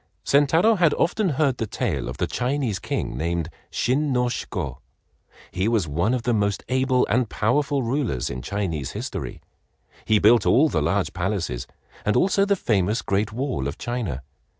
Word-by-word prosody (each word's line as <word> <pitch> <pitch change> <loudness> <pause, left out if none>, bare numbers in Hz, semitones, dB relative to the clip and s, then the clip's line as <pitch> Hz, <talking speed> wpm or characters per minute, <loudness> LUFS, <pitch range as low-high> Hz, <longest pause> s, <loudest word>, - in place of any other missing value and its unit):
Sentaro 160 +10 +4
had 170 -4 +4
often 195 +3 +1
heard 140 -3 +1
the 115 - -1
tale - - -2
of 65 - -6
the 90 - 0
Chinese 125 - -1
King - - -3
named 85 0 -2 0.2
Shin 140 +4 0
no 125 -1 +2
Shiko. - - -4 0.7
He 95 +3 -1
was 110 -7 +1
one 85 - +1
of 120 - -3
the 120 - +1
most 100 -2 0
able 130 0 +2
and 120 +1 +1
powerful 140 +6 +1
rulers 115 - -1
in 65 - -5
Chinese 85 -7 -3
history. - - -5 0.6
He 110 - +4
built 110 +1 +5
all 150 +5 +5
the - - 0
large 100 -1 0
palaces, 90 - -2 0.4
and 105 - +1
also 195 +8 +3
the 200 0 +2
famous 105 - 0
great 100 +2 0
wall 125 - -2
of 70 - -5
China. 110 - -3
115 Hz, 170 wpm, -24 LUFS, 95-135 Hz, 0.7 s, built